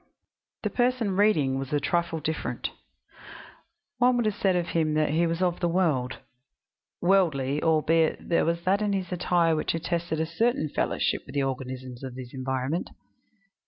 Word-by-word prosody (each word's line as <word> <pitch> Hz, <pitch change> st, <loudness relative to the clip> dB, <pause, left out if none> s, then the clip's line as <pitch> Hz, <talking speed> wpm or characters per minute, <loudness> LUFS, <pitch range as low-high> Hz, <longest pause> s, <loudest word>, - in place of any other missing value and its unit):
The -, -, -1 dB
person 245 Hz, -5 st, +1 dB
reading 155 Hz, -11 st, +3 dB
was 135 Hz, +2 st, -5 dB
a 145 Hz, -, +2 dB
trifle 165 Hz, +2 st, 0 dB
different; 160 Hz, +1 st, -3 dB, 1.3 s
one 250 Hz, 0 st, +4 dB
would 240 Hz, -, +1 dB
have 215 Hz, -, +1 dB
said 190 Hz, -2 st, +1 dB
of 175 Hz, -1 st, -1 dB
him 155 Hz, -2 st, +1 dB
that 155 Hz, -1 st, +2 dB
he 165 Hz, +2 st, +2 dB
was 165 Hz, +2 st, -1 dB
of 180 Hz, -1 st, 0 dB
the 175 Hz, -, +1 dB
world, 160 Hz, -8 st, +1 dB, 0.8 s
worldly, 150 Hz, -7 st, +2 dB
albeit 160 Hz, 0 st, +2 dB
there 170 Hz, -, +2 dB
was 170 Hz, +1 st, -1 dB
that 195 Hz, +3 st, +2 dB
in 205 Hz, -1 st, +1 dB
his 190 Hz, -2 st, -2 dB
attire 175 Hz, -2 st, +2 dB
which 155 Hz, -, -1 dB
attested 170 Hz, -1 st, -2 dB
a 160 Hz, -, +1 dB
certain 170 Hz, -1 st, 0 dB
fellowship -, -, 0 dB
with 135 Hz, -, -10 dB
the 140 Hz, -, +2 dB
organisms 130 Hz, -1 st, -5 dB
of 130 Hz, -2 st, -6 dB
his 125 Hz, -2 st, -9 dB
environment. 130 Hz, +4 st, -2 dB
165 Hz, 165 wpm, -27 LUFS, 140-185 Hz, 1.3 s, one